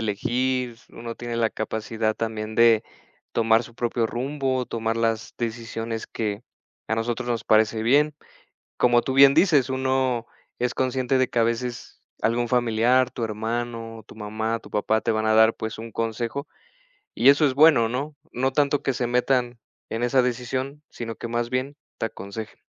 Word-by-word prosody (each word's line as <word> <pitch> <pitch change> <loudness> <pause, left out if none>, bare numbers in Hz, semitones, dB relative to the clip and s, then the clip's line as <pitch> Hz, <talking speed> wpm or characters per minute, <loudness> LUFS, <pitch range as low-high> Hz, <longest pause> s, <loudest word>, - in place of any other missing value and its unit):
elegir. 120 +3 -1
Uno 115 0 -7
tiene 120 0 -5
la 115 -1 +2
capacidad 110 0 -2
también 110 -1 -4
de 115 -1 +5 0.5
tomar 115 0 +3
su 120 - -13
propio 120 -1 0
rumbo, 130 +1 -2
tomar 115 0 -2
las 115 -1 -1
decisiones 115 -1 -4
que 105 -1 -3 0.5
a 110 - +1
nosotros 120 +2 -2
nos 115 -2 -1
parece 110 0 +3
bien. 145 +6 +3 0.6
Como 120 -1 +4
tú 130 - -2
bien 135 0 +8
dices: 150 -9 +4
"Uno 130 -2 0 0.3
es 125 0 -1
consciente 130 0 0
de 130 -1 +2
que - - -2
a - - +5
veces 120 +1 -3 0.2
algún 115 +2 +1
familiar, 125 +1 +3
tu - - -6
hermano, 115 +1 -4
tu - - -14
mamá, 110 +2 -2
tu - - -15
papá 110 +1 +1
te 115 - +1
van 110 0 0
a 110 - +3
dar, 110 +1 +6
pues 110 0 -5
un 115 0 -8
consejo". 115 +6 -3 0.7
Y 130 - +6
eso 145 +2 +5
es 135 - -1
bueno, 145 -6 +6
¿no?, 140 +6 -3 0.2
no 130 +2 0
tanto 145 +1 +1
que - - +1
se 125 -1 -1
metan 125 0 +1 0.3
en 115 +1 -3
esa 130 +2 +3
decisión, 130 +4 -3
sino 115 -1 -6
que 115 - -7
más 120 0 -1
bien 130 +3 -2 0.2
te 115 - -1
aconsejen. 110 0 -8
120 Hz, 170 wpm, -24 LUFS, 115-130 Hz, 0.7 s, bien